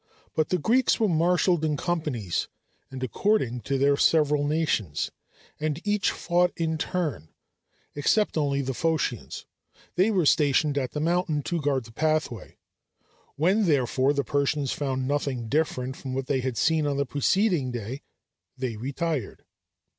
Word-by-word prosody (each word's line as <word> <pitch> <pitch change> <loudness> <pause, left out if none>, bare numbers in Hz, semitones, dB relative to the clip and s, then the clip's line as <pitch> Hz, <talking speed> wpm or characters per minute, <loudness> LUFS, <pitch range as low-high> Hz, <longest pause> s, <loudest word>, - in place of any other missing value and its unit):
But 155 - 0
the 180 - +2
Greeks 235 - +2
were 220 - +3
marshalled 175 0 +2
in 150 -2 0
companies 150 - -2 0.4
and 130 -1 -6
according 130 - 0
to 135 +5 -1
their 140 +1 +3
several 150 -1 +3
nations, 145 - 0 0.5
and 155 0 -1
each 205 -1 +2
fought 175 0 +1
in 160 -1 -1
turn, 150 - -2 0.6
except 205 +9 +1
only 140 -3 0
the 135 0 -2
Phocians; 160 +2 -2 0.5
they 185 +4 +3
were 190 -6 +2
stationed 145 -1 +3
at 130 -3 -2
the 150 - -2
mountain 165 -2 0
to 170 +2 -2
guard 140 -3 0
the 115 - -13
pathway. 155 -5 -1 0.8
When, 190 +8 +2
therefore, 135 -3 +2
the 140 -1 0
Persians 140 +1 0
found 130 -2 -2
nothing 140 -4 -1
different 130 -2 -1
from 130 -2 -6
what 135 0 -2
they 135 0 0
had 130 -2 -3
seen 155 -1 +2
on 140 -1 -1
the 140 - +1
preceding 145 - +1
day, 120 +2 -5 0.6
they 125 -4 -3
retired. 140 0 -3
145 Hz, 150 wpm, -26 LUFS, 130-165 Hz, 0.8 s, were